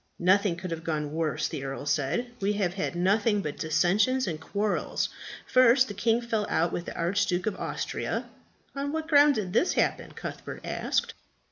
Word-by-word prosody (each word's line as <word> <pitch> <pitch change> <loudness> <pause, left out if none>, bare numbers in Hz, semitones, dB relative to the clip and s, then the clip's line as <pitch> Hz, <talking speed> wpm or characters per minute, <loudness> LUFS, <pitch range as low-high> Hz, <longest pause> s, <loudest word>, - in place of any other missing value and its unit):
"Nothing 185 +1 +3
could 180 +1 -6
have 165 -1 -4
gone 150 -2 -2
worse," 160 -2 -1
the 135 - -5
earl 135 +1 -5
said. 155 - 0
"We 200 0 +1
have 195 -4 0
had 190 -2 -3
nothing 205 +3 +2
but 150 - -5
dissensions 195 +11 +2
and 160 -4 -4
quarrels. 205 +5 -1 0.4
First, 255 +1 +5
the 205 - -6
king 225 +3 +1
fell 225 -3 -1
out 170 +1 +1
with 175 - -3
the - - -7
Archduke 180 +1 0
of 215 -3 -1
Austria." - - -3 0.5
"On 280 +1 -2
what 320 0 -2
ground 290 -2 +6
did 190 -4 -3
this 340 - +3
happen?" - - 0
Cuthbert - - -7
asked. - - -1
195 Hz, 175 wpm, -28 LUFS, 170-230 Hz, 0.5 s, ground